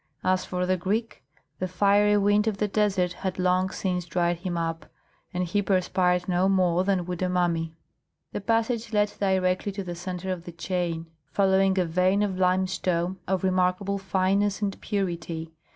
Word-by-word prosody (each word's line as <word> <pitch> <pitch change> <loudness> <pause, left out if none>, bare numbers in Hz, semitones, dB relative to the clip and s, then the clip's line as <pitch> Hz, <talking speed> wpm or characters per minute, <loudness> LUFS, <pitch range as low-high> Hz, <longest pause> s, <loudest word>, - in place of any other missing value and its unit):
As 185 0 +2
for 180 0 -2
the 185 0 +1
Greek, 210 +6 -2 0.4
the 185 - -1
fiery 205 +3 +3
wind 205 +1 +3
of 215 -3 0
the 210 - 0
desert 195 -4 +1
had 185 0 -4
long 185 0 +2
since 180 -2 -2
dried 175 0 0
him 175 0 -4
up, 165 -1 -3 0.4
and 180 0 -1
he 180 +4 0
perspired 180 -2 +1
no 185 +1 +2
more 180 -2 +3
than 190 -2 +1
would 180 0 -5
a 185 - +1
mummy. 170 -3 0 0.6
The - - -4
passage 225 +1 0
led 210 0 +2
directly 190 0 +1
to 195 0 -4
the 175 -1 -5
centre 180 +2 -5
of 175 -2 -5
the 175 - -8
chain, 170 -1 -2 0.3
following 190 +1 +3
a 185 - +3
vein 185 +4 +2
of 190 -2 -2
limestone 185 -1 +1
of 190 +1 0
remarkable 185 +2 +1
fineness 195 +1 +1
and 200 -2 -3
purity. 170 -5 -3
185 Hz, 170 wpm, -26 LUFS, 180-195 Hz, 0.6 s, fiery